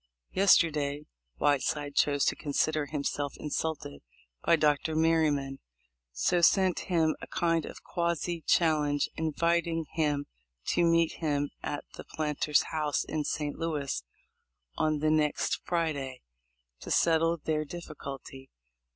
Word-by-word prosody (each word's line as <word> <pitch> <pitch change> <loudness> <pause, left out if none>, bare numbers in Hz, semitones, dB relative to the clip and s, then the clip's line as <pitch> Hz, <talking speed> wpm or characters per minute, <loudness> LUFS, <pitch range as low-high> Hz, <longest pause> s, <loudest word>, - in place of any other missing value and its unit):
Yesterday 150 -6 +3 0.3
Whiteside 145 - +1
chose 145 0 +2
to - - +2
consider 150 0 0
himself 145 -1 -3
insulted 150 - -3 0.4
by - - +5
Dr. 150 0 +1
Merryman, 155 -4 +2 0.5
so 65 - +1
sent 185 +1 +4
him 160 -3 +2
a - - -7
kind 165 -3 0
of - - -10
quasi 170 -1 -2
challenge 150 -3 +2
invit 170 +2 +1
ing 165 -1 -2
him 145 -3 0 0.4
to 175 - +2
meet 165 -1 +3
him 145 -3 0
at 145 - -4
the - - -7
Planter's 150 -1 0
House 155 -2 0
in 155 -1 -2
St. 150 -2 -3
Louis, 150 - -2 0.7
on 155 -1 0
the 155 0 +3
next 155 -1 +1
Friday, 145 -7 -2 0.6
to - - -9
settle 165 0 +3
their 155 0 -1
difficulty. 140 -4 -9
155 Hz, 125 wpm, -29 LUFS, 145-165 Hz, 0.7 s, by